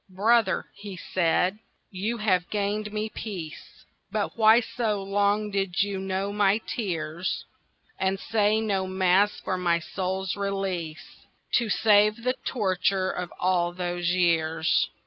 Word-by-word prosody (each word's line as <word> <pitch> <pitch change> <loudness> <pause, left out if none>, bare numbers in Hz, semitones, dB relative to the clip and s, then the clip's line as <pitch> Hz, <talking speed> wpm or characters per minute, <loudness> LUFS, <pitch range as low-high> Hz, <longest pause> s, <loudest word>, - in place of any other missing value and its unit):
"Brother," 205 +2 +2
he 200 -2 -9
said, 180 +3 +1 0.3
"you 210 +5 -2
have 185 -5 +1
gained 210 +1 -2
me 215 +1 -2
peace, 185 -8 -8 0.3
But 210 -1 -2
why 220 0 +6
so 220 -4 -2
long 205 +1 +1
did 195 -2 0
you 200 -1 -3
know 190 +1 -2
my 205 0 +3
tears, 180 -6 -3 0.5
And 190 0 0
say 215 0 +2
no 195 -3 -1
Mass 190 +2 +2
for 185 -1 -2
my 170 -2 +2
soul's 190 +2 -3
release, 190 -4 -4 0.3
To 235 -2 +2
save 210 +2 +4
the 255 +1 +2
torture 190 -3 0
of 180 -1 -5
all 175 -1 +1
those 175 -1 -2
years?" 165 -2 +2
195 Hz, 130 wpm, -26 LUFS, 180-210 Hz, 0.5 s, why